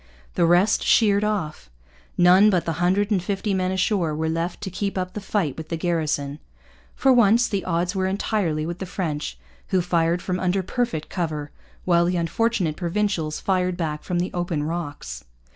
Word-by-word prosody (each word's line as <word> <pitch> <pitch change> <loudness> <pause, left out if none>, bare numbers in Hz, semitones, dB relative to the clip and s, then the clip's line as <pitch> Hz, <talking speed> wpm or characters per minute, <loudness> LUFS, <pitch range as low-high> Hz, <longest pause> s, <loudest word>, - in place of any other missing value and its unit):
The 170 - +2
rest 180 +5 +3
sheered 205 -2 +4
off. 170 - -2 0.5
None 185 +4 +6
but 180 -4 +1
the 165 - -1
hundred 200 +4 +2
and 195 -3 +2
fifty 200 +2 -2
men 185 -1 0
ashore 185 -4 0
were 160 +1 -1
left 165 +2 -2
to 195 -3 -5
keep 195 +1 -3
up 185 0 -3
the 210 - -5
fight 190 -8 -1
with 160 -1 -8
the 165 - -2
garrison. 155 -4 -1 0.6
For 265 -1 +4
once 235 0 +5
the 200 -2 -2
odds 180 +2 -1
were 190 0 0
entirely 190 -5 -1
with 170 +1 -5
the 190 - -5
French, 150 - -3 0.3
who 185 - +2
fired 170 -1 +1
from 180 -1 -2
under 185 +1 0
perfect 230 -6 -2
cover, 155 -5 -3 0.3
while 170 -1 +4
the 180 +1 0
unfortunate 175 -1 0
Provincials 175 -3 -1
fired 185 -2 0
back 155 -3 -3
from 180 - -2
the 175 +1 -2
open 175 -4 -2
rocks. 145 - -5
180 Hz, 180 wpm, -23 LUFS, 165-195 Hz, 0.6 s, None